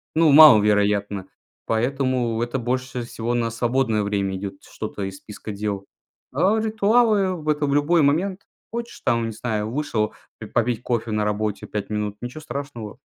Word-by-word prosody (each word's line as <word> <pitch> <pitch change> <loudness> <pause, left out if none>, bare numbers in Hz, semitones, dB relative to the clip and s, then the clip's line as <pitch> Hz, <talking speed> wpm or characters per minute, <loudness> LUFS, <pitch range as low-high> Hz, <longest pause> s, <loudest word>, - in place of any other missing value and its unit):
Ну, 160 -1 +5
маловероятно. 105 -8 +6 0.4
Поэтому 125 -1 0
это 120 +2 -1
больше 125 0 -2
всего 115 0 -3
на 115 -1 0
свободное 120 -1 +1
время 100 -2 -1
идет, 95 0 -7
что-то 100 - -6
из 95 0 -5
списка 105 +2 -9
дел. 100 -1 -3 0.5
А 190 +10 +3
ритуалы- 210 -6 +2
это 150 0 0
в 140 - 0
любой 155 +4 +3
момент. 180 +7 +1 0.3
Хочешь 235 +1 -6
там, 115 -3 +1
не 115 - -3
знаю, 110 -1 -2
вышел 115 -6 -1 0.3
ты - - -7
попить 120 -1 0
кофе 115 -2 -2
на 105 0 0
работе 105 0 -2
5 105 -2 -4
минут- 105 -1 -2
ничего 125 +5 -6
страшного. 140 -7 -7
120 Hz, 155 wpm, -23 LUFS, 105-145 Hz, 0.5 s, маловероятно